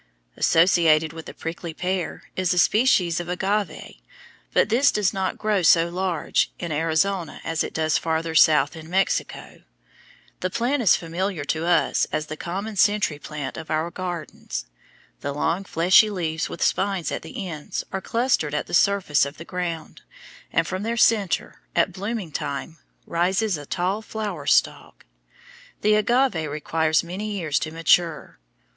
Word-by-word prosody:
Associated 165 -2 +4
with 160 -1 -9
the - - -8
prickly 165 0 -6
pear 180 0 -3
is 185 -1 +1
a - - -4
species 180 -4 +3
of 175 0 -6
agave, 195 +3 -2 0.5
but - - +3
this 255 +6 +4
does 205 -1 +1
not 190 -2 -2
grow 215 -3 +1
so 170 0 +5
large 180 -2 0
in 170 -2 -5
Arizona 165 +3 0
as 165 -1 -1
it - - -5
does 155 0 +1
farther 160 0 -2
south 150 0 +5
in 160 0 -10
Mexico. 190 +2 -1 0.8
The 185 - -1
plant 245 +8 0
is 210 - +5
familiar 175 0 -3
to 160 +1 -3
us 175 -2 +2
as 155 0 -1
the 155 - -6
common 195 +6 -5
century 205 -6 +2
plant 150 -3 -6
of 160 - -8
our 160 +2 -1
gardens. 175 -2 -5 0.5
The 140 - -4
long 165 +6 -1
fleshy 185 +5 +5
leaves 165 -5 -2
with - - -4
spines 190 -4 0
at - - -3
the 185 +4 -6
ends 155 -4 -5
are 190 - -2
clustered 230 - 0
at - - -1
the - - -11
surface 190 -5 +3
of 140 +2 -4
the 165 - -9
ground, 175 -3 -5 0.5
and - - +2
from 185 0 -4
their 230 +2 -2
centre, 210 -7 +2
at 170 +2 +2
blooming 200 -2 -4
time, 150 +2 -5 0.3
rises 190 +4 +1
a 145 -2 -8
tall 190 +4 -1
flower 205 -9 -5
stalk. - - +1 0.8
The 215 +1 +3
agave 215 - +2
requires 155 +2 0
many 200 +5 -5
years 165 -7 0
to 160 - -3
mature. 165 0 +1
175 Hz, 160 wpm, -24 LUFS, 160-195 Hz, 0.8 s, so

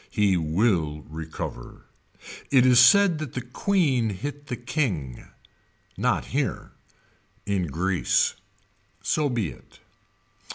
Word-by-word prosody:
He 105 -4 +2
will 80 -2 0
recover. 80 -6 -7 0.6
It 130 -3 +5
is 125 -1 +6
said 175 +5 +6
that 155 -6 -6
the 130 - -2
Queen 135 - +1
hit 145 +9 -6
the 125 - -3
King. 110 - -3 0.7
Not - - 0
here. - - -2 0.7
In 95 -4 -1
Greece. 90 +5 +1 0.7
So 150 -2 +1
be 115 - -1
it. 65 - -16
115 Hz, 110 wpm, -25 LUFS, 85-135 Hz, 0.7 s, is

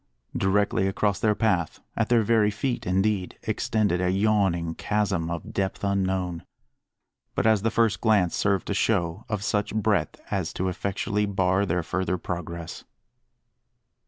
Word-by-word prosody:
Directly 95 0 +2
across 100 +1 0
their 110 -3 +2
path, 95 -8 0 0.2
at 115 - 0
their 120 -2 +4
very 110 -1 +3
feet 120 +2 -3
indeed, 95 +1 0
extended 100 -5 0
a 90 - +1
yawning 95 -4 +1
chasm, 100 -4 -1
of 85 -1 -5
depth 95 0 -2
unknown 95 -3 -1 0.9
but, - - 0
as 110 -3 +4
the 115 - +1
first 115 -1 +1
glance 105 -6 +3
served 100 -2 +1
to - - -2
show, 95 -2 0
of 105 -3 -2
such 105 0 -1
breadth 105 -7 0
as - - -1
to 95 +1 -1
effectually 100 +3 -1
bar 95 0 +1
their 90 0 0
further 90 +2 -1
progress. 85 -1 -6
100 Hz, 145 wpm, -26 LUFS, 90-105 Hz, 0.9 s, their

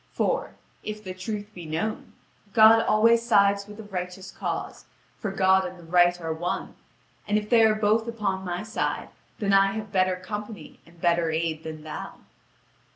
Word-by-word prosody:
For, - - -1 0.3
if 215 0 -6
the 185 -2 -6
truth 205 +3 -5
be 175 -4 -9
known, 160 +8 -3 0.4
God 225 +1 +7
always 230 +1 +4
sides 200 -3 +3
with 210 0 -11
the 220 - -8
righteous 185 -1 -6
cause, - - -5 0.3
for 215 - -3
God 190 0 +3
and 180 0 -6
the 175 - -14
Right 175 +1 +3
are 165 -1 -3
one; 175 +3 -3 0.5
and 210 - +2
if 210 0 -4
they 230 -2 +6
are 220 -1 +5
both 215 +2 +1
upon 205 -5 -2
my 180 +1 -3
side, 220 +1 -3 0.3
then 200 -2 0
I 195 0 +5
have 215 -1 -6
better 185 -1 +2
company 210 -2 -8
and 170 0 -20
better 170 -1 +2
aid 160 0 -1
than 155 -1 -7
thou." 155 -1 -7
195 Hz, 175 wpm, -26 LUFS, 175-215 Hz, 0.5 s, God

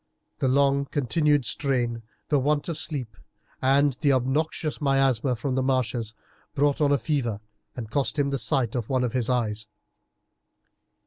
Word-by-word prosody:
The 135 - +1
long 140 +1 +3
continued 145 +1 +1
strain, 120 -5 -1 0.3
the 145 -3 +3
want 145 +2 0
of 170 - -2
sleep, 140 -7 -4 0.5
and 140 +2 +3
the 145 -3 +4
obnoxious 150 +5 -1
miasma 135 -3 +2
from 130 +3 -3
the 130 - +1
marshes, 125 -4 -1 0.4
brought 145 +1 +2
on 145 -1 +3
a 145 - +4
fever 120 -4 -1 0.4
and 115 -4 -7
cost 140 +3 0
him 140 -1 +1
the 135 - -1
sight 130 -6 0
of 120 -3 -3
one 130 -2 +1
of 120 - -1
his 125 -2 -1
eyes. 110 -4 -1
135 Hz, 155 wpm, -25 LUFS, 120-145 Hz, 0.5 s, the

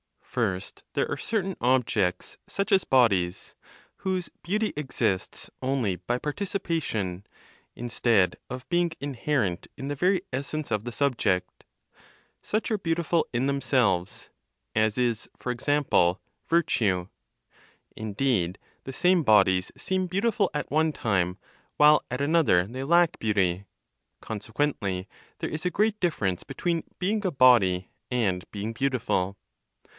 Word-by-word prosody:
First, 100 -6 -3
there - - +1
are - - -1
certain 195 -4 -2
objects, 115 -7 +1
such 200 +2 -2
as 195 -2 +4
bodies, 100 -9 +2 0.4
whose 185 -2 -2
beauty 210 +5 0
exists 115 -9 -2
only 130 -8 0
by 105 +8 -2
participation, 150 - -2 0.5
instead 115 -5 +1
of 125 0 -7
being 175 -1 +2
inherent 135 -8 -1
in 135 +2 -5
the - - -1
very 180 +5 +2
essence 140 +1 -3
of 105 0 -1
the 120 - -4
subject. 120 -9 0 0.8
Such 220 +3 -2
are 215 - +2
beautiful 170 -2 0
in 120 +2 +1
themselves, 125 -10 0 0.4
as 110 0 +2
is, 120 -3 0
for 125 - -4
example, 125 -9 +2 0.3
virtue. 105 - +2 0.9
Indeed, 110 -4 0 0.3
the 135 - -6
same 180 +3 +3
bodies 95 -6 +4
seem 185 -1 -1
beautiful 200 +2 +1
at 150 - -3
one 155 +1 +2
time, 95 -7 0 0.4
while 150 0 +6
at 125 +2 -3
another 145 - +3
they 130 +6 -5
lack 170 +2 +3
beauty; 100 -3 +1 0.6
consequently, 105 -4 -2 0.3
there - - -2
is 155 +3 -4
a - - +3
great 215 +3 +1
difference 105 - 0
between 165 +4 -2
being 205 +3 0
a 185 - 0
body 115 - +4 0.2
and 100 -8 0
being 105 +2 -4
beautiful. 110 -7 0
130 Hz, 125 wpm, -27 LUFS, 100-165 Hz, 0.9 s, while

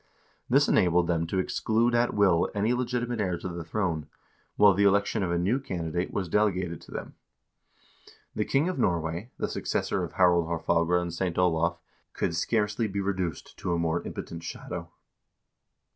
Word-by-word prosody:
This - - +4
enabled 90 0 +3
them 85 -1 0
to 95 - -2
exclude 115 +5 +1
at 120 0 +2
will 95 -5 +3
any 105 +4 +2
legitimate 120 -2 -1
heir 90 -4 0
to 90 - -6
the 85 -1 -5
throne, 85 -3 -2 0.5
while 105 -1 +6
the 100 +2 +2
election 100 +2 +3
of 95 - 0
a 85 - +1
new 100 +10 +1
candi 85 - -4
date 90 +1 -1
was 95 -3 -2
delegated 90 -3 0
to - - -16
them. - - -6 1.2
The 105 - 0
king 140 +8 +1
of 185 - -2
Norway, 85 +4 -1
the - - -1
successor - - -1
of - - -6
Harald 90 -3 +4
Haarfagre 85 +1 +1
and 85 -1 -4
St. 85 0 -2
Olav, 85 -1 +2 0.4
could 85 - -1
scarcely 105 +4 0
be 100 0 -3
reduced 95 -5 -3
to 90 - -1
a - - +1
more 85 0 0
impotent 85 - -7
shadow. 85 - -6
90 Hz, 175 wpm, -28 LUFS, 85-105 Hz, 1.2 s, while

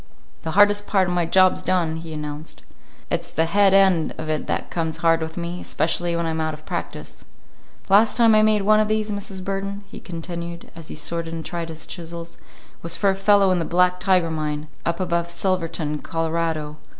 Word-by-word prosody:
"The 160 - -4
hardest 205 0 +5
part 190 -3 +2
of 180 - -1
my 175 -2 +1
job's 185 +2 +4
done," 170 -4 0
he 165 0 -8
announced. 150 0 -7 0.5
"It's - - -2
the 160 - +1
head 200 +3 +4
end 190 -4 +4
of 155 0 -5
it 155 -1 -2
that - - -2
comes 160 -2 -2
hard 165 0 +4
with 160 +1 -5
me, 175 +1 -4
especially 175 -1 0
when 170 0 -1
I'm 160 0 -1
out 155 -1 -1
of 155 - -17
practice. - - -6 0.6
The 195 - -1
last 215 +4 +5
time 230 -2 +6
I 215 - +6
made 215 -1 +3
one 215 +1 +5
of 215 - +2
these, 215 0 0
Mrs. 195 -2 -4
Burden," 195 +1 -4
he - - -9
continued, 170 -1 -7
as 165 -1 -10
he - - -7
sorted 165 -1 -2
and 160 - -6
tried 170 -1 -4
his 160 -1 -5
chisels, 170 -1 -8 0.4
"was 170 0 -1
for 200 -2 +3
a - - -2
fellow 195 0 +4
in 180 - +2
the - - 0
Black 180 +2 +2
Tiger 180 -4 +2
mine, 150 -1 -3 0.2
up 170 - -1
above 170 -2 -1
Silverton, 170 -4 -2
Colorado. 160 -2 -2
170 Hz, 205 wpm, -22 LUFS, 165-195 Hz, 0.6 s, time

